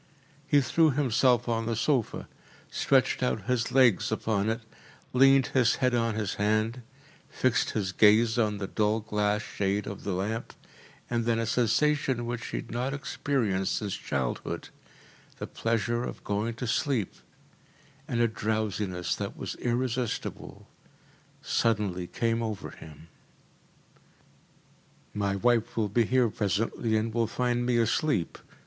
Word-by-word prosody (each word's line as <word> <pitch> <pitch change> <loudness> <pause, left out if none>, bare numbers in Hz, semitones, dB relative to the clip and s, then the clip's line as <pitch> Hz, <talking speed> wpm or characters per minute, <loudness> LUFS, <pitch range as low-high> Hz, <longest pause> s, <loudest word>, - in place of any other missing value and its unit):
He 145 -1 +4
threw 160 +5 +3
himself 125 -3 +2
on 115 -1 -1
the 115 - 0
sofa, 125 0 0 0.4
stretched 135 -2 +2
out 125 -5 0
his 120 +1 0
legs 125 -7 +4
upon 110 -1 0
it, 115 +2 -2 0.5
leaned 135 +1 +6
his 125 -3 +4
head 125 -1 +1
on 115 -2 +1
his 105 -2 -2
hand, 110 +4 +1 0.5
fixed 130 -2 +1
his 95 -3 -1
gaze 110 +3 +4
on 105 -2 +1
the 100 - -3
dull 105 +2 0
glass 105 0 0
shade 100 0 -1
of 100 - -7
the 100 - -2
lamp, 105 +5 -3 0.5
and 120 -1 -1
then 115 -1 +2
a 115 - 0
sensation 125 +2 +1
which 120 -1 -4
he - - -4
had - - -7
not 125 +4 -2
experienced 115 -9 -1
since 105 -3 -3
his - - -11
childhood, 65 -3 -3 0.7
the - - -5
pleasure 115 +1 -1
of - - -6
going 105 +3 -2
to 120 - -4
sleep, 120 - 0 0.9
and 120 -6 -1
a 120 - +4
drowsiness 105 -5 -2
that - - -5
was - - -4
irresistible 125 0 -3 0.8
suddenly 100 -6 0
came 115 +3 -1
over 110 -3 -4
him. 80 +1 -13 2.1
“My 100 -1 -1
wife 115 +3 +1
will 110 -2 +1
be 115 +3 +2
here 125 0 +3
presently 110 +3 0
and 110 +1 -1
will 115 -1 +1
find 120 +1 -1
me 125 -1 +2
asleep. 115 - 0
115 Hz, 140 wpm, -28 LUFS, 105-125 Hz, 2.1 s, leaned